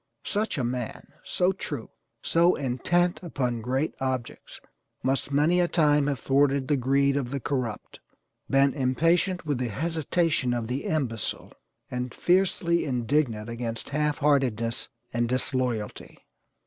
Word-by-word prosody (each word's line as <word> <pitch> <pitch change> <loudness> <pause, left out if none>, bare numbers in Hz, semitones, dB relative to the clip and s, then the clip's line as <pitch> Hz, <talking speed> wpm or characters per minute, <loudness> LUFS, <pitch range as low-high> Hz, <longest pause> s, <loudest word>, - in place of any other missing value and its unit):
Such 210 -3 -1
a 130 - 0
man, 120 -1 -4
so 180 +1 +1
true, 145 -10 -5 0.3
so 170 +2 +4
intent 175 +7 +1
upon 125 -9 -2
great 130 +6 -1
objects 130 -2 -4 0.4
must 135 +1 0
many 155 +5 +3
a 175 - +3
time 150 -4 +3
have 140 -2 0
thwarted 135 +1 +2
the 150 - +3
greed 140 +2 +2
of 135 -4 -1
the 140 +1 -3
corrupt, 125 -5 -3 0.5
been 135 0 +4
impatient 165 +7 +1
with 145 -4 -1
the 125 -2 -1
hesitation 160 - 0
of 120 -2 -2
the 125 +4 -3
imbecile, 130 -8 -2 0.4
and 125 -1 -4
fiercely 175 -2 +2
indignant 120 -3 0
against 115 -1 -4
half 150 0 0
heartedness 125 -6 +1 0.2
and 120 0 0
disloyalty. 125 -4 -2
135 Hz, 135 wpm, -27 LUFS, 125-155 Hz, 0.5 s, so